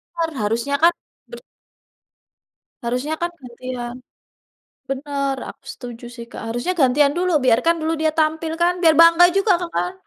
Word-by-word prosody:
Kan 330 Hz, -1 st, -1 dB
harusnya 235 Hz, +7 st, -1 dB
kan, 340 Hz, -, +7 dB, 0.4 s
bert 480 Hz, -, -10 dB, 1.4 s
Harusnya 250 Hz, +6 st, -2 dB
kan 345 Hz, 0 st, -1 dB
gantian, 245 Hz, -1 st, -7 dB, 0.9 s
benar 275 Hz, 0 st, -2 dB
aku -, -, -14 dB
setuju 240 Hz, -1 st, -10 dB
sih, 235 Hz, -1 st, -8 dB
Kak, -, -, -8 dB
harusnya 240 Hz, +10 st, -2 dB
gantian 280 Hz, +2 st, +4 dB
dulu, 365 Hz, 0 st, 0 dB
biarkan 255 Hz, +8 st, +3 dB
dulu 320 Hz, +1 st, 0 dB
dia 315 Hz, 0 st, +2 dB
tampil 315 Hz, +1 st, 0 dB
kan 350 Hz, +1 st, +4 dB
biar 325 Hz, -2 st, +6 dB
bangga 335 Hz, +1 st, +7 dB
juga, 395 Hz, +1 st, +3 dB
Kak, 350 Hz, -, -4 dB
kan. 360 Hz, -, -1 dB
285 Hz, 150 wpm, -21 LUFS, 250-335 Hz, 1.4 s, kan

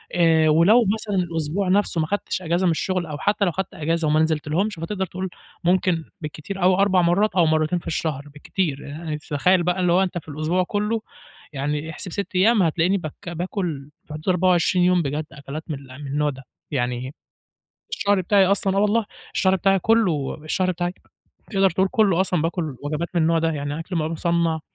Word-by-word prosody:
آآ، 160 Hz, -2 st, +4 dB
ولو 200 Hz, +10 st, +5 dB
مثلًا 215 Hz, -2 st, -3 dB
الأسبوع 165 Hz, +3 st, -2 dB
نَفسه 185 Hz, -3 st, +2 dB
ما 155 Hz, -, -1 dB
خدتش 205 Hz, -1 st, -2 dB
أجازة 175 Hz, +1 st, 0 dB
من 175 Hz, -, +4 dB
الشغل 180 Hz, +2 st, -1 dB
أو 150 Hz, -2 st, -6 dB
حتّى 205 Hz, +3 st, +1 dB
لو 175 Hz, -, +1 dB
خدت 190 Hz, +2 st, -4 dB
أجازة 165 Hz, +1 st, -1 dB
وما 155 Hz, +1 st, +3 dB
نزلتلهمش، 160 Hz, +6 st, 0 dB
فتقدر 190 Hz, +3 st, -2 dB
تقول 185 Hz, +2 st, -5 dB, 0.3 s
ممكن 175 Hz, -2 st, +2 dB, 0.2 s
بالكتير 155 Hz, +5 st, -6 dB
أوي 185 Hz, +1 st, +5 dB
4 190 Hz, -1 st, +3 dB
مرات 190 Hz, +5 st, +2 dB
أو 175 Hz, -, +5 dB
مرتين 155 Hz, +2 st, +1 dB
في -, -, -13 dB
الشهر 150 Hz, -3 st, -2 dB
بالكتير، 150 Hz, -1 st, -2 dB, 0.3 s
ي 150 Hz, -1 st, -2 dB
تتخيّل 170 Hz, +5 st, +1 dB
بقى 180 Hz, +2 st, 0 dB
اللي 180 Hz, -1 st, +2 dB
هو 185 Hz, +2 st, +4 dB
أنت 180 Hz, -2 st, -3 dB
في 160 Hz, -, -7 dB
الأسبوع 155 Hz, +5 st, 0 dB
كلّه 210 Hz, +4 st, -1 dB, 0.5 s
يعني 145 Hz, +3 st, -2 dB
احسب 170 Hz, +3 st, -6 dB
6 200 Hz, +1 st, -4 dB
أيام 210 Hz, +2 st, +4 dB
هتلاقيني 170 Hz, +4 st, +2 dB
بك 170 Hz, +2 st, -7 dB
باكل 170 Hz, -4 st, -4 dB, 0.2 s
في 150 Hz, -, -10 dB
حدود 155 Hz, +4 st, -4 dB
24 180 Hz, 0 st, +3 dB
يوم 180 Hz, -1 st, +4 dB
بجد 150 Hz, +1 st, -2 dB
أكلات 140 Hz, +3 st, -7 dB
مل 150 Hz, -4 st, -3 dB, 0.2 s
من 145 Hz, -, -6 dB
النوع 150 Hz, +2 st, 0 dB
ده، 135 Hz, -1 st, -8 dB, 0.3 s
يعني 125 Hz, 0 st, -2 dB, 0.8 s
الشهر 200 Hz, -1 st, +1 dB
بتاعي 195 Hz, +1 st, +4 dB
أصلًا 195 Hz, 0 st, +1 dB
آه -, -, +3 dB
والله، 210 Hz, +2 st, +2 dB, 0.3 s
الشهر 190 Hz, -1 st, +3 dB
بتاعي 195 Hz, +1 st, +3 dB
كلّه، 185 Hz, -9 st, +1 dB
الشهر 185 Hz, +4 st, 0 dB
بتاعي 175 Hz, 0 st, -2 dB, 0.6 s
تقدر 195 Hz, -2 st, +3 dB
تقول 190 Hz, +3 st, +1 dB
كلّه 200 Hz, -7 st, +3 dB
أصلًا 180 Hz, -4 st, +1 dB
باكل 165 Hz, -4 st, -2 dB
وجبات 155 Hz, +4 st, -2 dB
من 170 Hz, -, +3 dB
النوع 165 Hz, +1 st, +3 dB
ده، 165 Hz, 0 st, +1 dB
يعني 145 Hz, 0 st, -3 dB
أكْل 175 Hz, +2 st, -5 dB
بقي 155 Hz, -1 st, 0 dB
مُصنّع 165 Hz, -1 st, 0 dB
175 Hz, 190 wpm, -23 LUFS, 155-190 Hz, 0.8 s, ولو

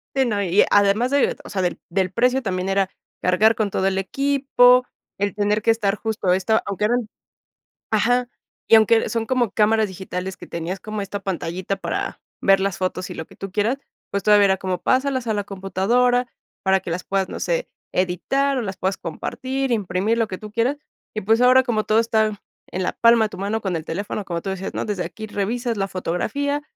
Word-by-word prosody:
Sí, 265 Hz, -1 st, +3 dB
no, 210 Hz, -4 st, 0 dB
y 190 Hz, +1 st, +4 dB
además 205 Hz, +5 st, +3 dB
de, 280 Hz, -1 st, +2 dB
o -, -, -11 dB
sea, 190 Hz, -, -2 dB
del 175 Hz, -1 st, -1 dB
del 185 Hz, +1 st, 0 dB
precio, 250 Hz, +5 st, +2 dB
también 185 Hz, -4 st, -2 dB
era 195 Hz, -1 st, +1 dB, 0.3 s
cargar 210 Hz, +5 st, +4 dB
con 215 Hz, -3 st, -1 dB
todo 190 Hz, -, 0 dB
el 195 Hz, 0 st, +1 dB
equipo, 250 Hz, +3 st, +3 dB, 0.3 s
el 200 Hz, 0 st, -1 dB
tener 210 Hz, +1 st, +1 dB
que 230 Hz, -, +3 dB
estar 215 Hz, -3 st, +1 dB
justo 215 Hz, -4 st, -1 dB
esto, 205 Hz, +4 st, +2 dB
aunque 200 Hz, +1 st, -2 dB
eran 240 Hz, 0 st, +1 dB, 0.8 s
ajá, 245 Hz, +3 st, +2 dB, 0.4 s
y -, -, +7 dB
aunque 225 Hz, +1 st, +5 dB
son 230 Hz, -1 st, -2 dB
como 245 Hz, -3 st, +1 dB
cámaras 220 Hz, 0 st, +3 dB
digitales 190 Hz, 0 st, -5 dB
que -, -, -12 dB
tenías 170 Hz, +3 st, -4 dB
como 215 Hz, -1 st, -4 dB
esta 200 Hz, 0 st, -5 dB
pantallita 185 Hz, 0 st, -3 dB
para -, -, -4 dB, 0.2 s
ver 195 Hz, -1 st, +5 dB
las 195 Hz, -1 st, -1 dB
fotos 185 Hz, 0 st, -2 dB
y -, -, -5 dB
lo 160 Hz, -, -6 dB
que -, -, -19 dB
tú 195 Hz, -1 st, -6 dB
quieras, 220 Hz, +6 st, +1 dB, 0.3 s
pues 200 Hz, -, -1 dB
todavía 210 Hz, -1 st, +6 dB
era 190 Hz, -1 st, +3 dB
como 185 Hz, -1 st, -3 dB
pásalas 260 Hz, -1 st, +1 dB
a 220 Hz, -, +1 dB
la 205 Hz, -1 st, -2 dB
computadora 230 Hz, +6 st, +1 dB, 0.3 s
para 190 Hz, 0 st, +2 dB
que 175 Hz, -, -6 dB
las 180 Hz, +2 st, -3 dB
puedas, 195 Hz, -1 st, 0 dB
no -, -, -6 dB
sé, -, -, -1 dB, 0.2 s
editar 270 Hz, +10 st, 0 dB
o -, -, 0 dB
las 195 Hz, -4 st, -4 dB
puedas 190 Hz, +1 st, -1 dB
compartir, 260 Hz, +10 st, -3 dB
imprimir, 205 Hz, 0 st, 0 dB
lo 225 Hz, -1 st, +1 dB
que 185 Hz, -, -5 dB
tú 215 Hz, +1 st, -10 dB
quieras. 235 Hz, +6 st, +1 dB, 0.4 s
Y, 215 Hz, -, -2 dB
pues 225 Hz, +3 st, +3 dB
ahora, 255 Hz, +1 st, +6 dB
como 225 Hz, -4 st, -1 dB
todo 215 Hz, +1 st, +3 dB
está 220 Hz, -2 st, +1 dB, 0.3 s
en 185 Hz, -, -2 dB
la -, -, 0 dB
palma 230 Hz, -1 st, +4 dB
de -, -, -3 dB
tu -, -, -10 dB
mano 205 Hz, +4 st, -2 dB
con 190 Hz, -4 st, -2 dB
el 160 Hz, -, -7 dB
teléfono, 200 Hz, +3 st, -4 dB
como 170 Hz, -2 st, -3 dB
tú 195 Hz, -, -4 dB
decías, 190 Hz, 0 st, -4 dB
¿no? -, -, -2 dB
Desde 200 Hz, -4 st, -2 dB
aquí 215 Hz, +6 st, -7 dB
revisas 230 Hz, +3 st, -2 dB
la 195 Hz, -1 st, 0 dB
fotografía. 220 Hz, +11 st, -2 dB
205 Hz, 210 wpm, -22 LUFS, 190-235 Hz, 0.8 s, y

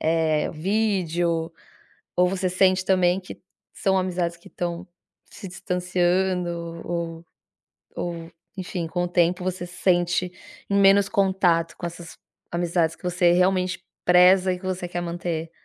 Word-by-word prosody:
eh, 160 Hz, -1 st, +1 dB
vídeo, 175 Hz, -3 st, 0 dB, 0.6 s
ou 180 Hz, 0 st, +4 dB
você 185 Hz, 0 st, -1 dB
sente, 185 Hz, 0 st, +2 dB
também, 185 Hz, -1 st, +3 dB
que 185 Hz, -, -11 dB, 0.3 s
são 190 Hz, -1 st, +1 dB
amizades 175 Hz, -2 st, -1 dB
que 170 Hz, -, -17 dB
tão 175 Hz, +1 st, -4 dB, 0.4 s
se 200 Hz, -, -9 dB
distanciando 180 Hz, -2 st, -1 dB
ou 170 Hz, -1 st, -4 dB, 0.7 s
ou, 170 Hz, -1 st, -5 dB, 0.2 s
enfim, 180 Hz, -3 st, -4 dB
com 175 Hz, +1 st, -2 dB
o -, -, -1 dB
tempo 175 Hz, +1 st, +1 dB
você 185 Hz, -1 st, -3 dB
se 175 Hz, -, -12 dB
sente 175 Hz, 0 st, +2 dB, 0.4 s
em 200 Hz, 0 st, +2 dB
menos 195 Hz, 0 st, +5 dB
contato 180 Hz, -4 st, +1 dB
com -, -, -6 dB
essas 170 Hz, 0 st, -8 dB, 0.3 s
amizades 170 Hz, -1 st, 0 dB
que -, -, -27 dB
você 180 Hz, -1 st, +2 dB
realmente 185 Hz, 0 st, +1 dB, 0.2 s
preza 180 Hz, +1 st, +5 dB
e -, -, -4 dB
que 185 Hz, -, -11 dB
você 185 Hz, -1 st, -3 dB
quer 175 Hz, 0 st, -4 dB
manter? 170 Hz, -1 st, -4 dB
180 Hz, 140 wpm, -24 LUFS, 170-185 Hz, 0.7 s, menos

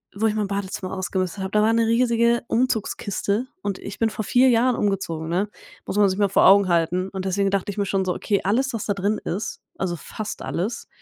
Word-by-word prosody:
wo 220 Hz, +2 st, +1 dB
ich 210 Hz, -, +1 dB
mein 210 Hz, -2 st, 0 dB
Badezimmer 195 Hz, -2 st, -4 dB
ausgemistet 190 Hz, 0 st, -2 dB
habe, 190 Hz, -, -4 dB
da 210 Hz, -, +3 dB
war 225 Hz, +1 st, +3 dB
'ne 230 Hz, 0 st, +3 dB
riesige 235 Hz, 0 st, +2 dB
Umzugskiste, 225 Hz, -1 st, -1 dB
und 195 Hz, -2 st, -3 dB
ich 200 Hz, -, -8 dB
bin 225 Hz, -1 st, +2 dB
vor 215 Hz, -, -4 dB
4 250 Hz, +5 st, +4 dB
Jahren 245 Hz, +1 st, +3 dB
umgezogen, 175 Hz, -6 st, -1 dB
ne? 190 Hz, +5 st, 0 dB, 0.4 s
Muss -, -, -4 dB
man 205 Hz, -1 st, +5 dB
sich 190 Hz, +1 st, -1 dB
mal 205 Hz, -1 st, +2 dB
vor 195 Hz, -, +4 dB
Augen 195 Hz, -1 st, +6 dB
halten. 175 Hz, +3 st, +1 dB
Und 190 Hz, -1 st, -5 dB
deswegen 195 Hz, +1 st, +1 dB
dachte 200 Hz, 0 st, -1 dB
ich 205 Hz, -, -5 dB
mir 200 Hz, -, +1 dB
schon 190 Hz, -1 st, 0 dB
so: 180 Hz, -, -1 dB
„Okay, 200 Hz, -3 st, 0 dB
alles, 255 Hz, +6 st, +1 dB
was 225 Hz, -, -3 dB
da 205 Hz, -, 0 dB
drin 200 Hz, +2 st, 0 dB
ist, 200 Hz, +5 st, -3 dB, 0.2 s
also 175 Hz, -2 st, -2 dB
fast 215 Hz, +7 st, -6 dB
alles, 200 Hz, +7 st, -3 dB
200 Hz, 230 wpm, -23 LUFS, 190-225 Hz, 0.4 s, Augen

